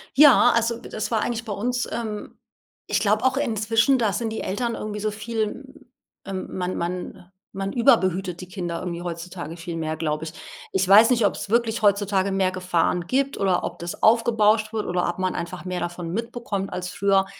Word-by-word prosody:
Ja, 275 Hz, -4 st, +7 dB
also 230 Hz, 0 st, +1 dB
das 215 Hz, -, -5 dB
war 220 Hz, -2 st, +2 dB
eigentlich 230 Hz, -1 st, -2 dB
bei 210 Hz, -, -3 dB
uns, 245 Hz, +4 st, -1 dB
ähm 215 Hz, -3 st, -5 dB, 0.6 s
ich 205 Hz, -, +3 dB
glaube 210 Hz, +2 st, +2 dB
auch 260 Hz, 0 st, +2 dB
inzwischen, 230 Hz, 0 st, +2 dB
da 220 Hz, -3 st, +2 dB
sind 225 Hz, +3 st, -2 dB
die 220 Hz, -, -4 dB
Eltern 235 Hz, +5 st, -2 dB
irgendwie 210 Hz, -2 st, -5 dB
so 215 Hz, +1 st, -1 dB
viel, 220 Hz, +1 st, -2 dB, 0.2 s
hm, 270 Hz, 0 st, -17 dB, 0.4 s
ähm 190 Hz, -1 st, -4 dB
man 180 Hz, 0 st, -2 dB
man 180 Hz, +1 st, -5 dB, 0.2 s
man 195 Hz, 0 st, -4 dB
überbehütet 190 Hz, -8 st, +2 dB
die 185 Hz, -, -8 dB
Kinder 175 Hz, -2 st, -4 dB
irgendwie 175 Hz, -1 st, -4 dB
heutzutage 170 Hz, -1 st, -6 dB
viel 170 Hz, 0 st, -6 dB
mehr, 160 Hz, -1 st, -3 dB
glaube 155 Hz, -1 st, -2 dB
ich. 160 Hz, 0 st, -6 dB, 0.4 s
Ich 190 Hz, -1 st, +1 dB
weiß 210 Hz, +4 st, +8 dB
nicht, 235 Hz, -4 st, +3 dB
ob's 200 Hz, -, -1 dB
wirklich 230 Hz, 0 st, +1 dB
heutzutage 200 Hz, -1 st, +2 dB
mehr 190 Hz, -1 st, +1 dB
Gefahren 180 Hz, -1 st, 0 dB
gibt 275 Hz, +1 st, 0 dB
oder 190 Hz, -2 st, +1 dB
ob -, -, -5 dB
das 170 Hz, 0 st, -6 dB
aufgebauscht 220 Hz, -1 st, +4 dB
wird 220 Hz, -2 st, -2 dB
oder 180 Hz, 0 st, 0 dB
ob 175 Hz, -, -4 dB
man 185 Hz, 0 st, -1 dB
einfach 175 Hz, +1 st, -5 dB
mehr 180 Hz, -1 st, -3 dB
davon 175 Hz, -1 st, -4 dB
mitbekommt 225 Hz, -2 st, -3 dB
als 180 Hz, 0 st, -4 dB
früher. 195 Hz, +1 st, +2 dB
200 Hz, 195 wpm, -24 LUFS, 180-230 Hz, 0.6 s, weiß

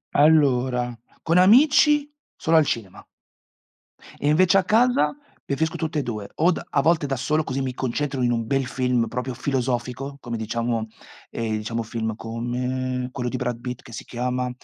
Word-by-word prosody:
Allora, 130 Hz, -5 st, +3 dB, 0.3 s
con 165 Hz, +2 st, +2 dB
amici 290 Hz, +7 st, +5 dB, 0.2 s
solo 165 Hz, -1 st, +2 dB
al 155 Hz, -, +5 dB
cinema 105 Hz, -8 st, -4 dB, 1.2 s
e, 145 Hz, -, -1 dB
invece, 185 Hz, +5 st, +4 dB
a 190 Hz, -, +3 dB
casa 245 Hz, +8 st, +3 dB, 0.3 s
preferisco 160 Hz, +4 st, -1 dB
tutte 155 Hz, -2 st, -2 dB
e 140 Hz, -, -1 dB
2, 105 Hz, -4 st, -5 dB
o 170 Hz, +4 st, +3 dB
d -, -, -2 dB
a 140 Hz, -, +2 dB
volte 160 Hz, 0 st, +2 dB
da 135 Hz, -2 st, -2 dB
solo, 155 Hz, +5 st, 0 dB
così 135 Hz, -2 st, -3 dB
mi 130 Hz, -1 st, -2 dB
concentro 130 Hz, +2 st, -2 dB
in 120 Hz, -, +2 dB
un 115 Hz, -1 st, -1 dB
bel 135 Hz, +1 st, +1 dB
film 125 Hz, -2 st, 0 dB
proprio 125 Hz, +3 st, -4 dB
filosofico, 130 Hz, +1 st, -2 dB
come, 120 Hz, -2 st, -4 dB
diciamo, 115 Hz, 0 st, -2 dB, 0.4 s
ehm, 110 Hz, -2 st, -2 dB
diciamo, 115 Hz, +2 st, -3 dB
film 110 Hz, -1 st, -3 dB
come 125 Hz, +2 st, -3 dB
quello 125 Hz, -2 st, -3 dB
di 130 Hz, -, -4 dB
Brad 125 Hz, -2 st, -3 dB
Pitt 125 Hz, 0 st, -6 dB
che 125 Hz, -, -14 dB
si -, -, -7 dB
chiama: 125 Hz, +1 st, -2 dB
125 Hz, 170 wpm, -23 LUFS, 120-150 Hz, 1.2 s, amici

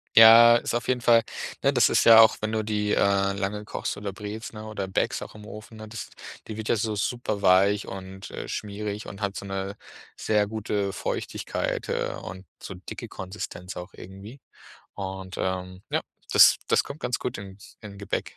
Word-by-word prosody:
Ja, 115 Hz, +1 st, +10 dB
ist 120 Hz, -, -1 dB
auf 120 Hz, -, -2 dB
jeden 125 Hz, -1 st, +1 dB
Fall 115 Hz, -1 st, +5 dB, 0.4 s
ne, -, -, +3 dB
das -, -, +4 dB
ist -, -, +3 dB
ja 115 Hz, -1 st, +9 dB
auch, 110 Hz, -, +5 dB
wenn 110 Hz, 0 st, -2 dB
du 110 Hz, -1 st, -1 dB
die, 105 Hz, -1 st, -1 dB
äh, 100 Hz, 0 st, +2 dB
lange 100 Hz, +2 st, -3 dB
kochst -, -, -4 dB
oder 100 Hz, -1 st, -5 dB
brätst, 105 Hz, +3 st, -7 dB
ne, 110 Hz, 0 st, -8 dB
oder 105 Hz, -3 st, -4 dB
bäckst 95 Hz, -, -1 dB
auch -, -, -9 dB
im 105 Hz, 0 st, -11 dB
Ofen, 110 Hz, +1 st, -10 dB
ne, 110 Hz, 0 st, -9 dB
das 115 Hz, +1 st, -7 dB, 0.4 s
die 110 Hz, -1 st, -6 dB
wird 110 Hz, -, -5 dB
ja -, -, +4 dB
so 110 Hz, 0 st, -1 dB
superweich 100 Hz, -3 st, +2 dB
und, 95 Hz, 0 st, -8 dB
äh, -, -, -6 dB
schmierig 105 Hz, 0 st, -5 dB
und 100 Hz, +1 st, -9 dB
hat 100 Hz, 0 st, -2 dB
so -, -, -6 dB
'ne 95 Hz, 0 st, -4 dB, 0.4 s
sehr 105 Hz, -1 st, +1 dB
gute 105 Hz, -2 st, -2 dB
Feuchtigkeit, -, -, -3 dB
äh, -, -, -1 dB
und 95 Hz, +1 st, -9 dB, 0.2 s
so -, -, -7 dB
dicke 90 Hz, -, -8 dB
Konsistenz 95 Hz, -1 st, -7 dB
auch 90 Hz, +1 st, -8 dB
irgendwie. 100 Hz, +8 st, -11 dB, 0.6 s
Und, 95 Hz, -1 st, -6 dB
ähm, 95 Hz, 0 st, -3 dB
ja, -, -, +1 dB, 0.3 s
das -, -, +8 dB
das -, -, +3 dB
kommt 145 Hz, +2 st, -9 dB
ganz 125 Hz, -, -1 dB
gut 125 Hz, -, -4 dB
in 95 Hz, 0 st, -10 dB, 0.2 s
in 100 Hz, -2 st, -10 dB
Gebäck. 100 Hz, -, -4 dB
105 Hz, 195 wpm, -26 LUFS, 95-110 Hz, 0.6 s, Ja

